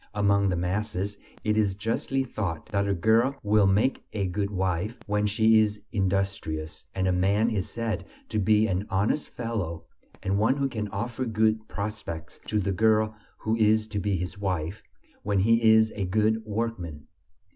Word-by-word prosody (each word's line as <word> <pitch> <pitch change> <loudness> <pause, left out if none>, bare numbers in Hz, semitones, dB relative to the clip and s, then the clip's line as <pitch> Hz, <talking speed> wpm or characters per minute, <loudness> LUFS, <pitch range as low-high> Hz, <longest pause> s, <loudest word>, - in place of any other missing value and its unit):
Among 100 -1 +3
the 90 - 0
masses, 100 +2 -2 0.2
it 105 0 +1
is 100 -3 +2
justly 115 +6 -1
thought 95 -10 -4
that 100 -2 0
a 100 - +2
girl 115 +9 +3
will 105 -1 +4
make 105 +8 +2
a 100 -3 -1
good 100 +2 -1
wife 95 +3 -1
when 105 0 +1
she 110 +1 +4
is 105 -1 +1
industrious, 95 -6 -2
and 95 -1 +1
a - - +3
man 100 +5 +2
is 100 -4 -1
said 115 -2 -3 0.2
to 110 - 0
be 105 +2 +4
an 95 0 -1
honest 100 +10 0
fellow 105 -9 -4 0.4
and 100 +1 +1
one 110 +5 +3
who 140 -1 +1
can 110 -4 -3
offer 110 +5 -3
good 110 -1 +1
prospects 100 -6 -5
to 105 - 0
the 100 0 0
girl 110 +2 +3 0.2
who 110 +1 -1
is 110 0 +4
to 105 -1 -2
be 100 0 0
his 90 +1 -5
wife, 90 -2 -2 0.4
when 100 -2 +1
he 115 +2 +4
is 110 0 +5
a 100 -2 -1
good 110 +4 +1
workman. 100 -9 -3
105 Hz, 175 wpm, -27 LUFS, 95-110 Hz, 0.4 s, is